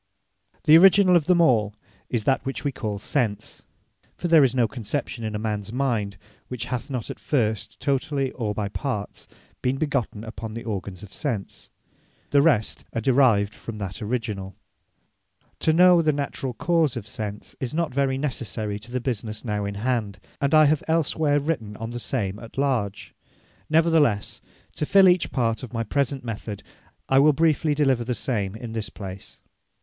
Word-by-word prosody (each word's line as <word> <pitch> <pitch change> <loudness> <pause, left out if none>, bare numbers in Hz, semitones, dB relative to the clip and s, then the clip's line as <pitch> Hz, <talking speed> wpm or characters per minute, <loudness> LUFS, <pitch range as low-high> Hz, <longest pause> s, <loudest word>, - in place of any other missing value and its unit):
The 155 0 +7
Originall 190 0 +6
of 165 -3 +3
them 180 -1 +4
all, 110 -9 +3 0.3
is 120 -4 -1
that 135 +5 +1
which 135 - -4
we 145 - 0
call 110 -5 -4
Sense; 110 -1 -2 0.6
(For 175 - -2
there 165 -3 +6
is 130 -1 +2
no 120 -3 +3
conception 120 +1 -4
in 110 -1 -3
a - - 0
mans 105 -1 -3
mind, 115 -7 -1 0.3
which 125 -2 -5
hath 125 +3 -4
not 125 -5 -4
at - - -9
first, 110 -7 -1
totally, 140 -1 0
or 105 -4 -3
by 105 -1 -1
parts, 105 -1 -4 0.3
been 130 +1 0
begotten 125 -7 -2
upon 110 -1 -7
the 115 - -5
organs 100 -3 -5
of 100 - -12
Sense.) 120 -10 -4 0.6
The 140 - +5
rest 140 -9 +2
are 115 - -1
derived 115 -5 +3
from 115 0 -8
that 95 -3 -6
originall. 105 -4 -3 1.0
To 160 - +2
know 175 +1 +6
the 155 -1 +3
naturall 135 -3 -3
cause 160 -2 +1
of 105 -3 -6
Sense, 105 -1 -6
is 125 -2 -3
not 160 -3 -1
very 135 -1 +1
necessary 115 -7 -3
to 110 +3 -13
the 125 - -1
business 115 -3 -4
now 105 -2 -1
in 100 0 -4
hand; 110 -2 -2 0.2
and 140 +2 +3
I 155 0 +7
have 150 0 +3
els 160 -1 +1
where 145 -2 +2
written 135 -9 -3
of 115 +1 -5
the 120 - -5
same 100 -3 -2
at 115 +2 -12
large. 125 -8 -1 0.6
Nevertheless, 155 -9 +2 0.4
to 150 - -1
fill 195 -1 +6
each 180 -1 +3
part 115 -4 0
of 125 -2 -9
my 115 -1 -1
present 140 +3 -1
method, 110 -3 -6 0.4
I 135 - +4
will 150 +2 +6
briefly 155 0 +2
deliver 135 -5 +2
the 125 +1 -2
same 105 -7 -2
in 115 0 -7
this 110 -2 -3
place. 95 -1 -9
120 Hz, 180 wpm, -24 LUFS, 105-145 Hz, 1.0 s, The